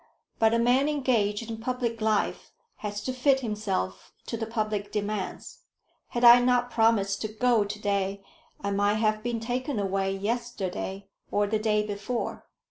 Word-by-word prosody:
But 220 -1 +5
a - - +3
man 250 +5 +3
engaged 230 -7 0
in 225 -1 -5
public 235 -1 -2
life 215 -1 0 0.3
has 205 -1 -5
to 255 - -2
fit 265 +1 +3
himself 200 - -3
to - - -4
the 225 -1 -3
public 215 -3 -2
demands. 210 -2 -4 0.5
Had 240 - -3
I 240 0 +10
not 245 0 +2
promised 220 -4 +2
to 215 - -1
go 220 +1 +2
to 205 +1 -6
day, 200 -1 -1 0.4
I 200 - -2
might 205 +1 +2
have 215 0 +1
been 235 0 -2
taken 250 +3 -2
away 195 -1 0
yesterday 200 -3 -3 0.2
or 205 0 +2
the 215 +1 0
day 210 -1 +1
before." 210 +3 -4
215 Hz, 160 wpm, -27 LUFS, 205-240 Hz, 0.5 s, I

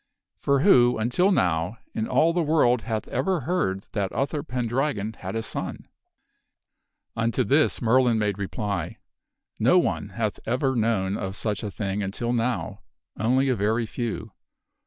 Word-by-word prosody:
For 140 -1 +2
who, 125 - +5
until 125 - +2
now, 90 - +1 0.2
in 110 - -2
all 165 +1 +3
the 175 - +1
world 145 -7 +3
hath 110 -3 -3
ever 165 +6 0
heard 155 - -1
that 100 -3 -1
Uther 140 +2 -1
Pendragon 125 -4 -2
had 95 -1 -7
a 115 - -1
son? - - -5 0.6
" - - -57
Unto 115 +1 +1
this 145 -1 +2
Merlin 120 0 +4
made 105 -2 -1
reply: 100 -2 -3 0.3
" - - -50
No - - +5
one - - 0
hath - - -3
ever 130 +3 +1
known 105 -4 +1
of 95 -1 -4
such 105 -1 -2
a 105 - -3
thing 100 0 -3
until 110 +5 -2
now, 115 -7 -1 0.4
only 130 +6 +2
a 130 - +2
very 110 +3 0
few. 110 -1 -4
115 Hz, 155 wpm, -25 LUFS, 105-130 Hz, 0.6 s, who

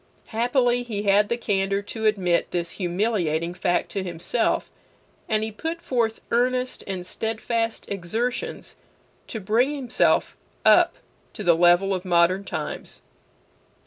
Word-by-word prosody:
Happily 245 +1 +2
he 215 -4 -4
had 205 +1 +4
the 235 - 0
candor 195 -3 0
to 220 +2 -2
admit 180 -5 +1
this 170 -1 -2
humiliating 175 -3 0
fact 175 0 0
to 195 - -2
himself, 180 +6 -1 0.6
and 215 -1 +1
he 220 - -3
put 325 +10 -4
forth 235 -7 -1
earnest 250 +1 +1
and 185 -2 -4
steadfast 225 +3 -2
exertions 220 +7 -3 0.5
to 220 - -5
bring 235 +9 +1
himself 255 -4 +1 0.3
up - - +6 0.4
to 210 - -6
the 175 -2 +5
level 175 +3 +4
of 185 -1 -2
modern 180 +1 +3
times. 160 -6 -6
210 Hz, 130 wpm, -24 LUFS, 180-235 Hz, 0.6 s, up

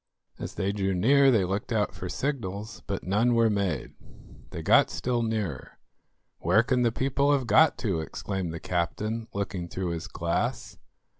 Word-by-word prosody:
As - - -6
they 95 +1 0
drew 95 -2 -1
near 135 +9 +5
they 110 -7 +3
looked 100 +6 -3
out 110 -2 +1
for 90 - -6
signals, 110 -6 -4
but 100 -2 -3
none 110 +6 +2
were 115 -1 +4
made. 95 -9 -1 0.6
They - - -6
got - - +5
still 120 -1 -1
nearer. 105 - -3 0.6
"Where 90 +7 +3
can 125 +1 +1
the 120 -1 +3
people 135 +4 +1
have 135 -3 +1
got 145 +9 +5
to?" 95 -6 0
exclaimed 90 +3 -4
the 85 - -6
captain, 105 +7 -2
looking 100 -3 -3
through 90 0 -3
his 85 -1 -4
glass. 85 0 -2
105 Hz, 165 wpm, -27 LUFS, 90-115 Hz, 0.6 s, near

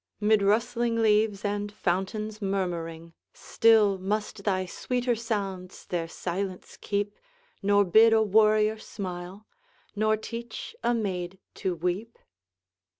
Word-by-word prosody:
Mid 215 0 +3
rustling 230 +3 +1
leaves 210 -2 +2
and 205 0 -2
fountains 210 +3 -2
murmuring, 170 -4 -3 0.2
Still 215 -4 +3
must 205 +1 -3
thy 185 -2 +1
sweeter 245 +6 -1
sounds 195 -5 -4
their 170 -2 -2
silence 185 +2 -5
keep, 205 0 -1 0.5
Nor 205 0 +4
bid 220 +5 +6
a 220 0 +5
warrior 215 +1 +3
smile, 185 0 -7 0.5
nor 215 +1 +2
teach 230 - -7
a 240 - +2
maid 190 -4 -3 0.2
to 185 -2 -2
weep? 180 +7 -3
205 Hz, 115 wpm, -27 LUFS, 185-220 Hz, 0.5 s, bid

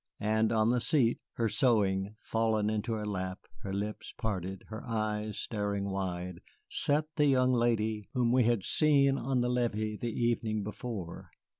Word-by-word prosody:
And 110 +1 +2
on 110 -1 +3
the 125 0 +2
seat, 120 -5 +2
her 115 - 0
sewing 105 -4 +2
fallen 110 -2 0
into 110 +2 -1
her 105 -1 -3
lap, 95 -2 -4 0.2
her 100 -3 -5
lips 105 +2 -4
parted, 95 -3 -3
her 110 +1 -6
eyes 110 -2 -2
staring 100 -2 -2
wide, 90 -2 -3 0.3
sat 150 +2 +1
the 150 -1 +4
young 130 -2 +4
lady 110 -3 +1
whom 120 -2 +2
we 125 -1 +4
had 115 -4 +2
seen 140 -3 +4
on 130 0 0
the 120 - +1
levee 110 -3 0
the 120 +1 -3
evening 115 -2 0
before. 105 -4 -6
110 Hz, 160 wpm, -31 LUFS, 105-120 Hz, 0.3 s, the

